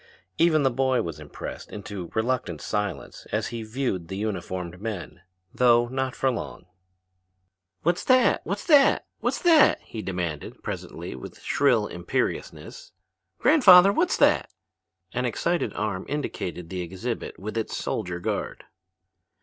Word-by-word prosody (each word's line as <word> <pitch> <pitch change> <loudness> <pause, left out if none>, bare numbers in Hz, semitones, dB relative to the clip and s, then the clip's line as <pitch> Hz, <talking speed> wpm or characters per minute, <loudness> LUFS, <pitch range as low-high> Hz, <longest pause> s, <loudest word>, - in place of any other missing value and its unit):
Even 160 -3 +4
the 135 - +3
boy 130 +1 +1
was 80 -3 -6
impressed 75 -1 -8
into 100 -4 -7
reluctant 110 -8 -1
silence 105 +3 -4
as - - -1
he 115 -1 -5
viewed 110 -6 -3
the 95 - -5
uniformed 90 -3 -4
men, 100 -5 -6 0.3
though 120 -1 +4
not 130 0 -2
for 135 - +1
long. 115 -6 -6 1.2
"What's 175 +2 +1
that, 255 -1 +4
what's - - -4
that, 290 -6 +5
what's - - -1
that?" 330 -4 +6
he 110 - -7
demanded 90 -6 -4
presently - - -6
with 65 - -10
shrill 125 -7 +2
imperiousness. 90 -3 -4 0.4
"Grandfather, 200 - +7
what's 345 - +1
that?" - - +3 0.6
An - - -1
excited 175 0 0
arm 105 -3 -3
indicated 90 - -4
the 90 -1 -3
exhibit 95 +7 -5
with 105 +4 -6
its 115 -1 -2
soldier 90 -5 -3
guard. - - -3
110 Hz, 135 wpm, -25 LUFS, 90-135 Hz, 1.2 s, Grandfather